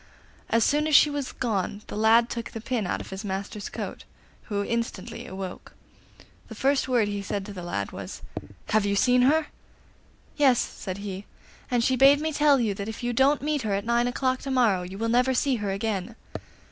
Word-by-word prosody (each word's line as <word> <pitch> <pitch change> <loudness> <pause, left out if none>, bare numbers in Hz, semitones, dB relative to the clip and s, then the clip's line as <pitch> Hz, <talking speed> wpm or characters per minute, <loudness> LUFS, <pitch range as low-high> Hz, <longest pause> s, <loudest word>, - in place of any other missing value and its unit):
As 230 0 +3
soon 300 +5 +2
as 310 - +3
she 300 - +7
was 285 -2 -3
gone 210 -3 -2
the - - -8
lad 225 +2 +5
took 235 -2 -5
the 225 - -7
pin 230 -3 -2
out - - -2
of - - -10
his 190 +2 -6
master's 200 +1 -4
coat, - - -6 0.4
who 205 -2 -2
instantly 230 -3 -4
awoke. 190 -1 -7 0.7
The 225 - -9
first 270 +4 +1
word 240 -5 +2
he 205 -1 -3
said 200 0 -3
to 205 - -8
the 185 - -7
lad 100 -13 -3
was, - - -8 0.5
'Have 215 0 +3
you 200 0 0
seen 250 +4 +4
her?' 300 +5 +4 0.9
'Yes,' 270 -5 +5
said 185 -2 -4
he, 200 -1 -6 0.4
'and 245 -2 +1
she 260 - +2
bade 275 +3 +6
me 315 +1 -2
tell 290 -2 +4
you 220 -4 +1
that 200 +2 -5
if 225 - -7
you 240 0 -1
don't 270 +3 +3
meet 300 -1 0
her 210 -3 -1
at 200 - -3
nine 235 +1 +2
o'clock 255 +1 0
to 275 - -6
morrow 235 -8 +3
you 180 +2 -7
will 225 +2 -1
never 250 +3 +2
see 265 0 +1
her 205 -2 -3
again. 200 +1 -2
230 Hz, 210 wpm, -26 LUFS, 200-260 Hz, 0.9 s, she